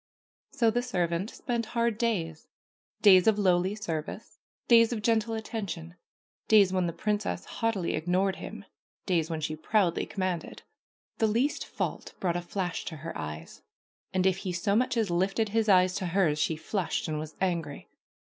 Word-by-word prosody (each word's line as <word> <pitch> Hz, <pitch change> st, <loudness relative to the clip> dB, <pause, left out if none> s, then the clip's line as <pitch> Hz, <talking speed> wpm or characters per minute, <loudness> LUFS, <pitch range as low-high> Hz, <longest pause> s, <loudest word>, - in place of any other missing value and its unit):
So 230 Hz, -2 st, +2 dB
the 240 Hz, +2 st, 0 dB
servant 180 Hz, -5 st, -1 dB
spent 235 Hz, -3 st, -3 dB
hard 235 Hz, -2 st, +1 dB
days, 170 Hz, -9 st, -1 dB, 0.6 s
days 190 Hz, -3 st, +7 dB
of 220 Hz, -2 st, +5 dB
lowly 185 Hz, 0 st, +2 dB
service, 165 Hz, -7 st, -5 dB, 0.3 s
days 230 Hz, -1 st, +6 dB
of 220 Hz, -3 st, -3 dB
gentle 225 Hz, 0 st, +1 dB
attention, 195 Hz, -7 st, -5 dB, 0.5 s
days 200 Hz, -4 st, +6 dB
when 185 Hz, -2 st, +1 dB
the -, -, -1 dB
princess 210 Hz, +4 st, -2 dB
haughtily 225 Hz, -6 st, -1 dB
ignored 185 Hz, +4 st, 0 dB
him, -, -, -8 dB, 0.4 s
days 170 Hz, -4 st, +1 dB
when 160 Hz, -1 st, -3 dB
she 155 Hz, +1 st, -2 dB
proudly 175 Hz, +2 st, +1 dB
commanded. 185 Hz, -4 st, -3 dB, 0.6 s
The 220 Hz, -, +4 dB
least 240 Hz, +7 st, 0 dB
fault -, -, -4 dB
brought 175 Hz, -2 st, 0 dB
a 175 Hz, -, -1 dB
flash 180 Hz, 0 st, -3 dB
to 160 Hz, -, -5 dB
her 160 Hz, +2 st, -7 dB
eyes, 75 Hz, +1 st, -7 dB, 0.5 s
and 185 Hz, 0 st, +1 dB
if 190 Hz, -1 st, +3 dB
he 190 Hz, -1 st, -4 dB
so 200 Hz, +4 st, 0 dB
much 250 Hz, +1 st, +1 dB
as 215 Hz, -5 st, +1 dB
lifted 195 Hz, +5 st, +1 dB
his 220 Hz, +1 st, +1 dB
eyes 185 Hz, -1 st, +5 dB
to 190 Hz, -, -2 dB
hers 170 Hz, -4 st, +2 dB
she 160 Hz, -, +1 dB
flushed 175 Hz, +4 st, -2 dB
and 155 Hz, -1 st, -2 dB
was 155 Hz, 0 st, -7 dB
angry. 170 Hz, -6 st, -2 dB
190 Hz, 170 wpm, -28 LUFS, 170-220 Hz, 0.6 s, days